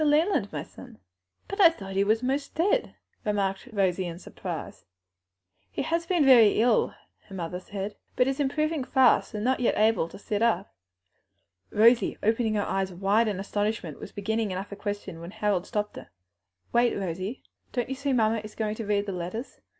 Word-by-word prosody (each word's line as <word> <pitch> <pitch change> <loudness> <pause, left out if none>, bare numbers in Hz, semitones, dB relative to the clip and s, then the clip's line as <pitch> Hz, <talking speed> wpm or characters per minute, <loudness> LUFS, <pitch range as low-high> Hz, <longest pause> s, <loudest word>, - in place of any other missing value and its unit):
Leland, 300 - +2
my 150 -1 -4
son." 235 +6 -13 0.5
"But 395 +1 -1
I 345 - +10
thought 195 -12 -8
he 195 - +3
was 220 +4 +1
most 275 +2 -2
dead," 385 +9 +1 0.3
remarked 200 +1 -1
Rosie 190 -3 +1
in 170 -1 -6
surprise. 180 - -7 0.8
"He 95 - -3
has 335 +1 -1
been 345 -6 +3
very 235 -7 +7
ill," 240 +2 +3 0.3
her 195 - -9
mother 180 0 -4
said, 200 +2 -6 0.2
"but 250 - +4
is 270 +2 -1
improving 305 +1 0
fast, 260 0 +4
though 210 - -4
not 255 +5 +1
yet 245 - +1
able 215 -5 +3
to 170 - -11
sit 205 +1 -3
up." 215 -5 +1 1.0
Rosie, 230 +3 +4
opening 220 0 +2
her 205 - 0
eyes 195 0 -1
wide 200 +5 +2
in 200 -3 -2
astonishment, 205 -5 -2
was - - -8
beginning 220 +1 -1
another 195 +2 -5
question 205 -4 -5
when 170 - -7
Harold 205 -3 -1
stopped 210 -2 -2
her. - - -10 0.6
"Wait, 240 0 +3
Rosie, 190 +5 -4 0.3
don't 245 -2 -1
you 265 - -3
see 280 +1 -2
mamma 225 -3 +2
is 215 0 -10
going 215 -1 -1
to 220 -1 -6
read 205 -1 +1
the 200 - -3
letters? 180 +7 -6
215 Hz, 180 wpm, -27 LUFS, 195-250 Hz, 1.0 s, I